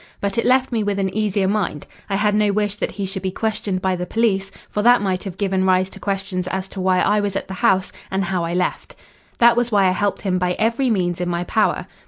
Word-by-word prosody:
But 200 Hz, -1 st, -2 dB
it -, -, 0 dB
left 260 Hz, +1 st, +3 dB
me 230 Hz, -2 st, 0 dB
with 205 Hz, -1 st, -1 dB
an 190 Hz, -1 st, -1 dB
easier 205 Hz, -3 st, +1 dB
mind. 195 Hz, -7 st, -1 dB, 0.2 s
I 195 Hz, -, 0 dB
had 210 Hz, +1 st, +2 dB
no 210 Hz, -1 st, +3 dB
wish 205 Hz, 0 st, 0 dB
that -, -, -3 dB
he 200 Hz, -, -3 dB
should 190 Hz, 0 st, -4 dB
be 190 Hz, -, -1 dB
questioned 210 Hz, -2 st, -2 dB
by 190 Hz, -1 st, +1 dB
the 180 Hz, 0 st, -4 dB
police, 195 Hz, -4 st, +1 dB, 0.2 s
for 210 Hz, -, -2 dB
that 245 Hz, +3 st, +6 dB
might 190 Hz, -2 st, -1 dB
have 190 Hz, -2 st, -6 dB
given 190 Hz, -2 st, 0 dB
rise 185 Hz, 0 st, +2 dB
to -, -, -11 dB
questions 195 Hz, -2 st, -2 dB
as 190 Hz, +1 st, -3 dB
to 190 Hz, -, -6 dB
why 185 Hz, 0 st, +2 dB
I 210 Hz, 0 st, +3 dB
was 205 Hz, -2 st, -2 dB
at -, -, -3 dB
the 190 Hz, -, -6 dB
house, 190 Hz, -1 st, +2 dB, 0.2 s
and 190 Hz, +1 st, -1 dB
how 180 Hz, -1 st, -1 dB
I 170 Hz, +1 st, -2 dB
left. 180 Hz, 0 st, -2 dB, 0.4 s
"That 235 Hz, 0 st, +6 dB
was 240 Hz, 0 st, 0 dB
why 200 Hz, -2 st, +4 dB
I -, -, +3 dB
helped 200 Hz, +2 st, -1 dB
him 185 Hz, -2 st, 0 dB
by 180 Hz, 0 st, +1 dB
every 230 Hz, +6 st, +1 dB
means 180 Hz, -5 st, 0 dB
in 175 Hz, -, -1 dB
my 175 Hz, 0 st, -1 dB
power. 215 Hz, +4 st, 0 dB
195 Hz, 260 wpm, -21 LUFS, 185-210 Hz, 0.4 s, that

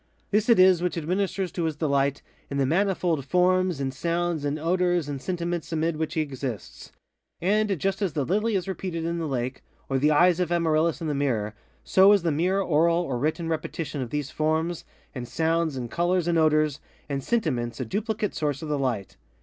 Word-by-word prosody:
This 210 Hz, +3 st, +2 dB
it 235 Hz, -, +6 dB
is 185 Hz, -2 st, +6 dB
which 180 Hz, -1 st, -1 dB
administers 185 Hz, +2 st, -1 dB
to 170 Hz, -1 st, -2 dB
his 160 Hz, -2 st, -1 dB
delight 140 Hz, -2 st, 0 dB, 0.3 s
in 140 Hz, -, -3 dB
the 135 Hz, -, +2 dB
manifold 175 Hz, -1 st, +1 dB
forms, 180 Hz, +2 st, +2 dB
and 135 Hz, -1 st, -2 dB
sounds, 170 Hz, +2 st, -1 dB
and 145 Hz, +1 st, -1 dB
odors 175 Hz, 0 st, +1 dB
and 140 Hz, -2 st, -5 dB
sentiments 175 Hz, 0 st, -3 dB
amid 165 Hz, 0 st, 0 dB
which 155 Hz, -1 st, -3 dB
he 160 Hz, -, +2 dB
exists. 130 Hz, -7 st, -6 dB, 0.5 s
And 205 Hz, +2 st, +1 dB
just 195 Hz, +3 st, -1 dB
as 190 Hz, -7 st, 0 dB
the 145 Hz, -3 st, -1 dB
lily 210 Hz, -, +1 dB
is 185 Hz, -2 st, -1 dB
repeated 180 Hz, -3 st, -4 dB
in 170 Hz, 0 st, -2 dB
the 165 Hz, -, -2 dB
lake, 130 Hz, -1 st, -3 dB, 0.3 s
or 135 Hz, -1 st, +1 dB
the 150 Hz, +3 st, +3 dB
eyes 175 Hz, +3 st, +4 dB
of 175 Hz, -2 st, 0 dB
Amaryllis 165 Hz, -1 st, +1 dB
in 165 Hz, -, -2 dB
the 150 Hz, -, 0 dB
mirror, 120 Hz, -7 st, -1 dB, 0.3 s
so 195 Hz, +2 st, +6 dB
is 200 Hz, -4 st, +2 dB
the 165 Hz, -, +1 dB
mere 180 Hz, +6 st, +1 dB
oral 170 Hz, -1 st, +3 dB
or 130 Hz, -7 st, -3 dB
written 160 Hz, +4 st, -1 dB
repetition 155 Hz, -2 st, -3 dB
of 125 Hz, -, -4 dB
these 145 Hz, 0 st, -3 dB
forms, 160 Hz, +2 st, -1 dB, 0.3 s
and 125 Hz, -3 st, -6 dB
sounds, 160 Hz, +2 st, 0 dB
and 120 Hz, -2 st, -5 dB
colors, 175 Hz, 0 st, +1 dB
and 170 Hz, -1 st, +2 dB
odors, 155 Hz, -2 st, +2 dB, 0.3 s
and 140 Hz, -2 st, -3 dB
sentiments 125 Hz, -, -1 dB
a 130 Hz, -, -2 dB
duplicate 215 Hz, -, -2 dB
source 145 Hz, -1 st, -2 dB
of 155 Hz, -, -5 dB
the 145 Hz, -1 st, 0 dB
light. 120 Hz, -8 st, -2 dB
165 Hz, 200 wpm, -26 LUFS, 140-180 Hz, 0.5 s, it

